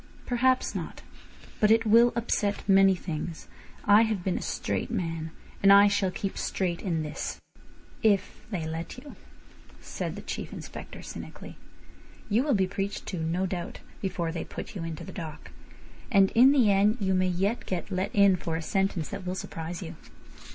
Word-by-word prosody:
"Perhaps 255 Hz, +1 st, +2 dB
not. -, -, -6 dB, 0.6 s
But 210 Hz, -, +4 dB
it 225 Hz, +1 st, +4 dB
will 230 Hz, +3 st, +6 dB
upset 210 Hz, -4 st, -1 dB
many 195 Hz, -1 st, +6 dB
things. 165 Hz, -2 st, -5 dB, 0.4 s
I 205 Hz, +2 st, +7 dB
have 220 Hz, -5 st, 0 dB
been 185 Hz, -1 st, 0 dB
a -, -, -7 dB
straight -, -, -2 dB
man, 165 Hz, -7 st, -3 dB, 0.3 s
and 195 Hz, -, +7 dB
I 200 Hz, +1 st, +8 dB
shall 200 Hz, -1 st, +1 dB
keep 195 Hz, +1 st, -4 dB
straight 175 Hz, -3 st, -1 dB
in 165 Hz, -5 st, -1 dB
this—" 150 Hz, 0 st, -5 dB, 0.6 s
"If 205 Hz, -3 st, +1 dB
they 180 Hz, -7 st, -3 dB
let 165 Hz, +7 st, -5 dB
you," 285 Hz, +3 st, -11 dB, 0.6 s
said -, -, -5 dB
the -, -, -8 dB
Chief -, -, -5 dB
Inspector -, -, -8 dB
cynically. -, -, -9 dB, 0.8 s
"You 220 Hz, +4 st, +4 dB
will 280 Hz, -2 st, +2 dB
be 190 Hz, -2 st, +3 dB
preached 195 Hz, +1 st, -4 dB
to, 185 Hz, -, -4 dB
no 165 Hz, +4 st, 0 dB
doubt, 175 Hz, -2 st, -4 dB, 0.2 s
before 180 Hz, -4 st, -2 dB
they 165 Hz, -, -4 dB
put -, -, -8 dB
you 180 Hz, -, -4 dB
into 165 Hz, -2 st, -5 dB
the -, -, -8 dB
dock. 160 Hz, -4 st, -8 dB, 0.6 s
And 195 Hz, -3 st, +5 dB
in 255 Hz, +4 st, +7 dB
the 250 Hz, -8 st, +4 dB
end 205 Hz, +3 st, +3 dB
you 190 Hz, -2 st, +1 dB
may 185 Hz, 0 st, +2 dB
yet 195 Hz, +6 st, -1 dB
get 185 Hz, +2 st, -3 dB
let 185 Hz, +1 st, -1 dB
in 200 Hz, -2 st, +6 dB
for 165 Hz, -1 st, -3 dB
a 165 Hz, -, -2 dB
sentence 190 Hz, -2 st, 0 dB
that 200 Hz, -, -6 dB
will 180 Hz, -, -2 dB
surprise 170 Hz, 0 st, -5 dB
you. 165 Hz, 0 st, -7 dB
195 Hz, 180 wpm, -28 LUFS, 175-210 Hz, 0.8 s, I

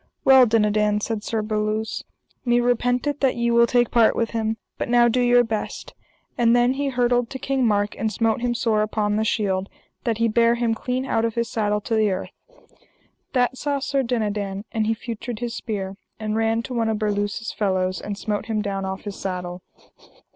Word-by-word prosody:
Well, 265 Hz, -2 st, +8 dB
Dinadan, 210 Hz, -1 st, +2 dB
said 210 Hz, 0 st, -3 dB
Sir 220 Hz, -1 st, -2 dB
Berluse, 215 Hz, 0 st, -2 dB, 0.4 s
me 240 Hz, -1 st, +3 dB
repenteth 245 Hz, +4 st, +1 dB
that 265 Hz, -2 st, +2 dB
ye 235 Hz, 0 st, 0 dB
will 235 Hz, 0 st, +5 dB
take 240 Hz, 0 st, +2 dB
part 230 Hz, -2 st, +4 dB
with 230 Hz, -, -1 dB
him, 225 Hz, -1 st, -1 dB, 0.2 s
but -, -, -2 dB
now 240 Hz, 0 st, +5 dB
do 245 Hz, +2 st, +2 dB
your 245 Hz, 0 st, +5 dB
best. 220 Hz, -2 st, -4 dB, 0.5 s
And 235 Hz, 0 st, +5 dB
then 245 Hz, +1 st, +3 dB
he 280 Hz, +1 st, -2 dB
hurtled 245 Hz, -2 st, +1 dB
to 265 Hz, -, -5 dB
King 265 Hz, -2 st, 0 dB
Mark, 205 Hz, -1 st, +1 dB
and 220 Hz, -1 st, -1 dB
smote 225 Hz, +2 st, 0 dB
him 240 Hz, -1 st, 0 dB
sore 225 Hz, -2 st, +1 dB
upon 210 Hz, -1 st, 0 dB
the 215 Hz, -, +1 dB
shield, 195 Hz, -3 st, 0 dB, 0.3 s
that 230 Hz, -3 st, 0 dB
he 230 Hz, 0 st, +2 dB
bare 230 Hz, +1 st, +3 dB
him 235 Hz, -1 st, +1 dB
clean 250 Hz, +3 st, -2 dB
out 225 Hz, -, 0 dB
of 230 Hz, -1 st, -1 dB
his 235 Hz, -1 st, -1 dB
saddle 210 Hz, -1 st, 0 dB
to 225 Hz, -, -4 dB
the 215 Hz, -1 st, +3 dB
earth. 185 Hz, -1 st, -3 dB, 1.0 s
That 250 Hz, 0 st, +1 dB
saw 285 Hz, -1 st, 0 dB
Sir 275 Hz, 0 st, 0 dB
Dinadan, 210 Hz, -5 st, -2 dB
and 220 Hz, -1 st, 0 dB
he 225 Hz, -, +1 dB
feutred 235 Hz, 0 st, -6 dB
his 235 Hz, +1 st, -4 dB
spear, 195 Hz, -4 st, -4 dB, 0.2 s
and 215 Hz, -1 st, -2 dB
ran 225 Hz, +1 st, +1 dB
to 255 Hz, -, -6 dB
one 230 Hz, -2 st, 0 dB
of 220 Hz, -, 0 dB
Berluse's 205 Hz, +1 st, -2 dB
fellows, 185 Hz, -3 st, 0 dB
and 205 Hz, -1 st, -5 dB
smote 210 Hz, 0 st, -3 dB
him 215 Hz, -2 st, -1 dB
down 195 Hz, -1 st, -3 dB
off 190 Hz, 0 st, -4 dB
his 205 Hz, -2 st, -6 dB
saddle. 180 Hz, -1 st, -4 dB
225 Hz, 200 wpm, -23 LUFS, 210-240 Hz, 1.0 s, Well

